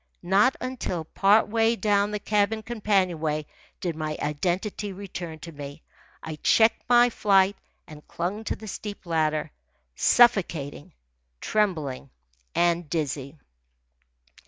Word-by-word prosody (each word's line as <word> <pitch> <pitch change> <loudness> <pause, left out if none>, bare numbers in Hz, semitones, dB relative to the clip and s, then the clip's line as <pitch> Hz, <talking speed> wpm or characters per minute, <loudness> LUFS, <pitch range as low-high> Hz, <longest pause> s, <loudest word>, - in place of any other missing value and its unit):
Not 200 +9 +3
until 255 -10 -3
part 200 +7 +3
way 225 +1 +2
down 205 -2 +2
the 210 - -2
cabin 210 +1 0
companionway 185 -9 0 0.3
did 170 -3 -3
my 155 -1 -3
identity 185 +7 -2
return 185 -4 -7
to 165 - -8
me. 145 0 -9 0.4
I 160 -1 -6
checked 220 +8 +3
my 245 0 +6
flight 195 -2 +3 0.3
and 150 -1 -13
clung 190 +6 -3
to - - -2
the 220 - -11
steep 205 0 -7
ladder, 155 -2 0 0.4
suffocating, 170 - +2 0.5
trembling, 155 -11 -1 0.5
and 170 -2 +1
dizzy. 145 -3 -3
185 Hz, 115 wpm, -26 LUFS, 155-210 Hz, 0.5 s, my